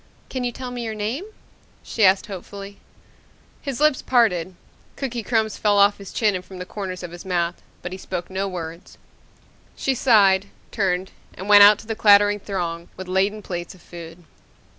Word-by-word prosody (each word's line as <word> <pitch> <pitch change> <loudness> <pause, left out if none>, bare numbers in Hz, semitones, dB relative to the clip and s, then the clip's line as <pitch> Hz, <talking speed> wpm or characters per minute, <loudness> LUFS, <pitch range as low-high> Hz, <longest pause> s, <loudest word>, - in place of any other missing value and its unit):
"Can 255 -1 -3
you 245 - -1
tell 250 +1 -7
me 245 -1 -5
your 220 -1 -4
name?" 225 - -3 0.6
she 225 - -1
asked 190 0 +5
hopefully. 200 +1 -9 0.8
His 275 -4 -4
lips 305 -2 +3
parted. 185 -8 +2 0.4
Cookie 245 -4 -3
crumbs 220 -1 0
fell 205 -1 +3
off 200 +1 +4
his 200 -2 -9
chin 215 -3 +2
and 180 -1 -4
from 190 0 -12
the 180 - -6
corners 185 -2 -6
of 175 - -6
his 175 0 -9
mouth, 175 -2 -1 0.2
but 180 - -5
he 185 - -7
spoke 180 -2 -5
no 190 +1 -2
words. 170 -2 -7 0.8
She 270 - 0
sighed, 205 -6 +4 0.2
turned, 190 -3 -1 0.2
and 190 - -8
went 205 0 +8
out 205 +1 +9
to - - -13
the 225 - -3
clattering 205 -1 +5
throng 175 -4 -4
with 185 - -7
laden 195 +3 0
plates 175 0 -6
of 180 - -19
food. 170 0 -11
200 Hz, 185 wpm, -22 LUFS, 180-220 Hz, 0.8 s, out